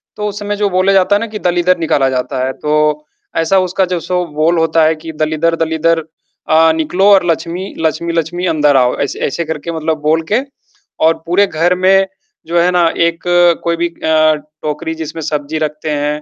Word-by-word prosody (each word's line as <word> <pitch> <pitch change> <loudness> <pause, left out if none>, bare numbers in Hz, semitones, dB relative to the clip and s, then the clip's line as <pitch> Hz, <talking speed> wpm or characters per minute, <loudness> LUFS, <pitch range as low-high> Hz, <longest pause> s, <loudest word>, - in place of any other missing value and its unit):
तो 210 0 -3
उस 205 +1 -7
समय 205 0 -3
जो 205 -1 +1
बोला 185 +1 +2
जाता 195 +1 +3
है - - +2
ना 230 - -3
कि 210 -1 -7
दलीदर 175 +1 +1
निकाला 145 -5 +1
जाता 130 0 -2
है, 130 - -2
तो 150 0 0 0.3
ऐसा 165 +4 +2
उसका 185 +1 0
जो 180 -1 -2
सो 180 +1 -2
बोल 165 +3 +2
होता 165 0 +2
है 160 0 +2
कि 160 +1 -9
दलीदर 155 +2 0
दलीदर 160 0 0 0.5
अ, 160 +1 +5
निकलो 165 +4 0
और 190 -2 +4
लक्ष्मी 175 +4 -4
लक्ष्मी 165 +1 -1
लक्ष्मी 170 +2 -2
अंदर 150 -4 +3
आओ। 125 -1 +2
ऐसे - - -3
ऐसे 165 +4 -3
करके 160 +1 -5
मतलब 160 0 -2
बोल 155 +2 +2
के 240 - +3 0.6
और 165 - +5
पूरे 195 +4 +3
घर 175 +1 +1
में, 190 +1 +3 0.4
जो 170 +1 +1
है 175 +1 +3
ना 175 -2 +3 0.2
एक 170 0 -5 0.4
कोई 170 0 0
भी 170 +1 0
अ, 155 -2 +2 0.3
टोकरी 150 +1 -3
जिसमें 160 0 -6
सब्जी 150 0 -3
रखते 155 0 -3
हैं, 150 +1 -2
165 Hz, 200 wpm, -14 LUFS, 155-180 Hz, 0.6 s, अ